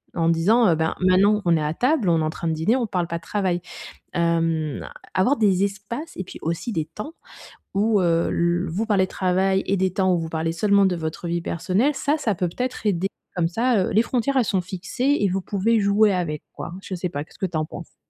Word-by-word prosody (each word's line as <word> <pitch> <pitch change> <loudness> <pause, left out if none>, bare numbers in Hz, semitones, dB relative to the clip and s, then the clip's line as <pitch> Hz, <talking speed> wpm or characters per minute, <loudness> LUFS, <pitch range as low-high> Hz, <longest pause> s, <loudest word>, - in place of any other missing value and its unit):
en 165 -1 +2
disant: 205 +9 +4
«Heu, 165 - +4
ben, 160 0 0
maintenant 195 +3 +4
on 170 -2 +3
est 155 - -1
à 150 +1 -1
table, 255 - +1
on 165 -2 +3
est - - 0
en 155 - 0
train 165 - -4
de 160 - +1
dîner, 170 +11 +1
on 235 -3 -1
parle 180 -3 -1
pas 170 0 -3
de 165 - -13
travail». 185 -4 -1 0.5
Hem, 165 -3 0 0.3
avoir 220 +10 +2
des 195 -3 +3
espaces 205 +11 -4
et 185 - -3
puis - - -10
aussi 170 +8 -3
des 160 - 0
temps 210 - -8 0.6
où, 210 0 +3
heu, 170 -1 +2
l 175 +2 +1
vous 195 +8 -1
parlez 200 -3 +3
de - - -14
travail 190 +1 +1
et 195 - +1
des 185 0 +1
temps 190 -1 +2
où 175 - +2
vous 165 -1 -3
parlez 160 0 -1
seulement 200 +3 +3
de 180 - 0
votre 160 +1 -4
vie 170 0 -1
personnelle, 185 - 0
ça, 295 +3 0
ça 220 -8 0
peut 180 +1 0
peut-être 250 +9 -4
aider, 195 0 +1 0.3
comme 170 -2 +1
ça, 230 +1 +2
heu, - - -1
les 215 - +4
frontières 255 +3 0
elles 250 - +4
sont 190 -3 +1
fixées 200 +10 -1
et 205 - +2
vous 190 +1 -1
pouvez 215 +4 +1
jouer 205 +1 +4
avec, 170 -5 -2
quoi. 170 - -7
Je 190 - -5
sais 180 0 -3
pas, 145 -2 -4
qu'est-ce - - -20
que - - 0
tu 170 -3 -3
en 155 - 0
penses? 170 +1 -10
185 Hz, 245 wpm, -23 LUFS, 170-210 Hz, 0.6 s, disant